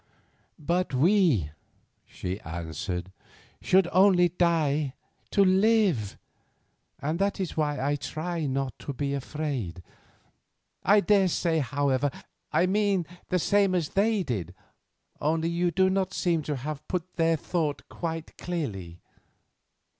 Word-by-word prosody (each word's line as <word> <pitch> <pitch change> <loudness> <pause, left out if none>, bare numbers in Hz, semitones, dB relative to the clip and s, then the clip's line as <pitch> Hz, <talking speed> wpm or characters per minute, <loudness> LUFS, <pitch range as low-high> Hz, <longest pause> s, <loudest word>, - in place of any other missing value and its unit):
"But 170 0 -1
we," 150 - +3 0.6
she 95 +2 -5
answered, 90 +2 -5 0.5
"should 185 -1 +4
only 185 -1 +5
die 155 -5 +1 0.3
to 200 - +4
live, 190 - +3 0.8
and 155 +5 -2
that 200 +1 0
is 185 -3 -3
why 150 -2 0
I 145 +2 0
try 155 +4 -3
not 135 -1 -2
to 140 - -5
be 140 +1 -2
afraid. 135 - -4 1.0
I 205 +2 +5
daresay, 185 -5 +2
however, 140 0 +1 0.4
I 180 - +3
mean 195 -2 +1 0.2
the 180 - +2
same 200 +1 +3
as 170 -4 0
they 210 0 +2
did, 95 - -4 0.6
only 160 +2 0
you 175 +1 +1
do 190 +2 +3
not 190 0 0
seem 170 -3 +1
to 145 - 0
have 145 +3 -6
put 180 -1 -4
their 165 -1 +3
thought 155 -2 -2
quite 165 -1 -5
clearly." 100 - -4
160 Hz, 125 wpm, -27 LUFS, 135-185 Hz, 1.0 s, only